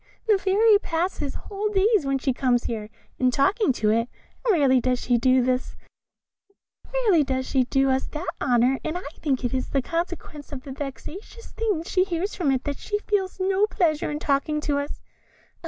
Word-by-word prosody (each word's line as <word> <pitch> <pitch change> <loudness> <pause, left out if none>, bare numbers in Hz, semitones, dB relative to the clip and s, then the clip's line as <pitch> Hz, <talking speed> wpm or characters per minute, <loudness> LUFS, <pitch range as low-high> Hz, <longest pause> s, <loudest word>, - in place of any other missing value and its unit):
The 420 -3 +4
Fairy 410 +2 +4
passes 330 -6 -2
whole 415 +1 -3
days, 405 -5 +2
when 275 0 +1
she 265 0 0
comes 245 -2 +1
here, 215 -2 -4 0.3
in 255 - +4
talking 370 - +2
to 215 -3 +1
it; 230 +2 +1 0.4
rarely 275 -8 +4
does 250 +1 +1
she 245 -1 +1
do 255 0 +3
us 255 0 -3 1.2
that 270 - +1
honour, 250 +1 +3
and 315 +2 -2
I 360 - -7 0.2
think 270 -4 -1
it 245 - -1
is 260 -1 -2
in 275 - +2
consequence 330 -3 -4
of 265 -3 -7
the 275 - -8
vexatious 300 - -8
things 410 -8 -2
she 370 - +2
hears 375 +2 -2
from 335 -6 0
it 260 -2 +1
that 285 -1 -4
she 415 - -2
feels 400 -3 -2
no 385 +2 +2
pleasure 315 -7 0
in 295 - -2
talking 300 +1 0
to 290 -1 0
us. 285 +1 -5
295 Hz, 170 wpm, -24 LUFS, 260-380 Hz, 1.2 s, The